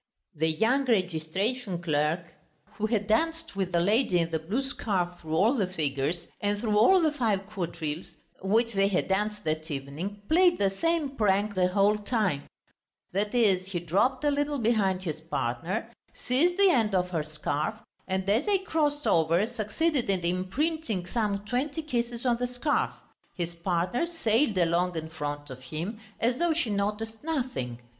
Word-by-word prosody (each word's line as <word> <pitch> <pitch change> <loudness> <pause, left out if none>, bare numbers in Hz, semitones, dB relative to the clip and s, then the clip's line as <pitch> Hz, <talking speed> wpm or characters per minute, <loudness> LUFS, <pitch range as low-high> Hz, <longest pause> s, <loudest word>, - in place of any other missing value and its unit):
The 160 +1 +1
young 230 - +2
registration 190 +1 0
clerk, 155 0 +1 0.6
who 215 - 0
had 215 -2 0
danced 325 +7 0
with 190 -2 -1
the 170 - +2
lady 205 +2 +3
in 165 -1 0
the 160 - 0
blue 200 - -2
scarf 185 -10 -1
through 160 -1 -4
all 215 +9 +4
the 210 -9 +1
figures 155 -1 -2 0.2
and 205 0 +1
through 215 -2 0
all 305 - +6
the 315 -2 +3
five 220 -9 0
quadrilles 170 -5 -4 0.3
which 225 +5 +2
they 195 0 +3
had 195 -2 0
danced 210 +2 -1
that 155 +1 -2
evening, 155 +9 -5
played 350 +2 +5
the 195 -1 +2
same 330 +6 0
prank 205 -1 +2
the 185 -2 +3
whole 200 +3 +3
time: 205 - 0 0.7
that 205 +4 -1
is, 195 -6 +3
he 175 - 0
dropped 195 - +1
a 295 - +3
little 290 0 0
behind 210 -6 +1
his 155 -3 -4
partner, 165 - -3 0.2
seized 335 +9 +1
the 395 -2 +6
end 220 - +2
of 180 0 +1
her 165 -3 0
scarf, 150 +4 -2 0.3
and 190 0 -1
as 220 - +2
they 410 -1 +4
crossed 300 -6 -1
over 165 +4 +3
succeeded 240 +5 -1
in 190 -2 +1
imprinting 190 - -1
some 205 0 -1
twenty 275 +8 -2
kisses 240 -4 -2
on 240 -2 +3
the 245 +1 -1
scarf. 250 +5 0 0.5
His 170 -1 -3
partner 180 - 0
sailed 235 - +1
along 175 +1 +2
in 160 0 -4
front 145 -2 -5
of 130 - -8
him, 165 - -5 0.2
as 240 +3 +1
though 345 -1 +3
she 305 -9 0
noticed 210 +3 -2
nothing. 255 - -2
205 Hz, 170 wpm, -28 LUFS, 175-245 Hz, 0.7 s, all